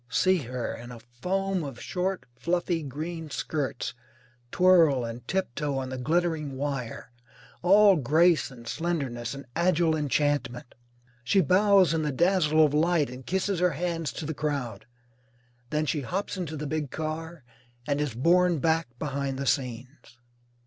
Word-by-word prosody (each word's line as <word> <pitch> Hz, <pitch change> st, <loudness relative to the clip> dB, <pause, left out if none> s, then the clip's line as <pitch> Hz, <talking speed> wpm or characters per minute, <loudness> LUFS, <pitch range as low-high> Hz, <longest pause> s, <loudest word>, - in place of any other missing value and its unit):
See 185 Hz, 0 st, +3 dB
her, 125 Hz, -4 st, -4 dB
in 120 Hz, +1 st, -9 dB
a 120 Hz, -, -9 dB
foam 180 Hz, +11 st, -2 dB
of 135 Hz, -5 st, -7 dB
short 185 Hz, +1 st, -2 dB
fluffy 175 Hz, +4 st, -1 dB
green 155 Hz, +3 st, -5 dB
skirts, 140 Hz, -3 st, -3 dB, 0.6 s
twirl 165 Hz, -9 st, +5 dB
and 115 Hz, +1 st, -7 dB
tiptoe 150 Hz, -6 st, -2 dB
on 130 Hz, -1 st, -3 dB
the 130 Hz, 0 st, -5 dB
glittering 155 Hz, -1 st, 0 dB
wire, 135 Hz, -4 st, -4 dB, 0.5 s
all 200 Hz, +1 st, +6 dB
grace 160 Hz, +5 st, +3 dB
and 120 Hz, -3 st, -13 dB
slenderness 135 Hz, -7 st, -3 dB
and 140 Hz, -, -9 dB
agile 170 Hz, -2 st, +2 dB
enchantment. 145 Hz, -4 st, -1 dB, 0.5 s
She 195 Hz, +11 st, +3 dB
bows 190 Hz, 0 st, +4 dB
in 160 Hz, -, +1 dB
the 150 Hz, -1 st, -1 dB
dazzle 160 Hz, 0 st, +3 dB
of 145 Hz, -, -1 dB
light 155 Hz, -3 st, +2 dB
and 125 Hz, 0 st, -10 dB
kisses 190 Hz, 0 st, 0 dB
her 180 Hz, -2 st, +2 dB
hands 165 Hz, 0 st, -2 dB
to 160 Hz, -, -5 dB
the 160 Hz, -, -3 dB
crowd. 130 Hz, -8 st, -3 dB, 0.8 s
Then 150 Hz, +2 st, 0 dB
she 150 Hz, 0 st, -1 dB
hops 185 Hz, +12 st, -3 dB
into 165 Hz, -5 st, -4 dB
the 150 Hz, -, -4 dB
big 150 Hz, -1 st, -2 dB
car 160 Hz, +1 st, -5 dB, 0.4 s
and 145 Hz, +1 st, 0 dB
is 140 Hz, -6 st, -2 dB
borne 175 Hz, +6 st, +3 dB
back 160 Hz, +1 st, +1 dB
behind 140 Hz, -1 st, -3 dB
the 140 Hz, -, -3 dB
scenes. 125 Hz, -1 st, -3 dB
155 Hz, 150 wpm, -27 LUFS, 135-175 Hz, 0.8 s, all